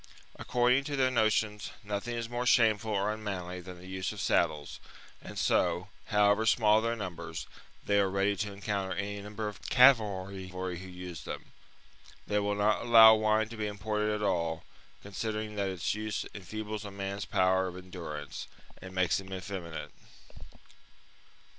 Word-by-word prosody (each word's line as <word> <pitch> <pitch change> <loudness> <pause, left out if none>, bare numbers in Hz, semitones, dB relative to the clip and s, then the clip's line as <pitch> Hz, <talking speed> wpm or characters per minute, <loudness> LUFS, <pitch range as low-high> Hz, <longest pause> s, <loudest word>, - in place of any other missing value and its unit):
According 125 +2 +2
to 145 0 -2
their 130 -1 +2
notions, 110 -3 +1
nothing 105 +4 -3
is 115 -1 -3
more 120 +1 -2
shameful 110 -3 +4
or 100 +1 +1
unmanly 90 -4 -5
than 90 0 -10
the 90 - -13
use 95 0 -3
of 105 - -8
saddles; 80 -6 0 0.4
and - - -9
so, 90 +3 +1 0.2
however 105 +1 +3
small 110 -1 +5
their 115 +1 0
numbers, 85 -7 -6 0.4
they 100 0 +3
are 100 -1 +3
ready 100 +1 +1
to 105 +2 -2
encounter 100 -1 -3
any 100 +2 -3
number 105 +1 -5
of 105 -4 -7
cavalry 100 -7 +4
who 90 0 -4
use 90 -2 -7
them. - - -7 0.7
They 105 - +1
will 105 0 0
not 105 +1 +2
allow 115 -2 +9
wine 110 0 +2
to 115 - -9
be 105 -1 -1
imported 105 +1 -1
at 105 0 -2
all, 85 -5 0 0.4
considering 105 +1 -4
that 100 -1 0
its 95 -1 -1
use 105 0 -3
enfeebles 105 +2 -5
a 105 - -6
man's 100 0 -4
power 95 0 +2
of 90 0 -7
endurance 90 -5 -7 0.3
and 95 0 -9
makes 90 0 +2
him 95 0 -10
effeminate. 90 -4 -6
100 Hz, 160 wpm, -30 LUFS, 95-110 Hz, 0.7 s, allow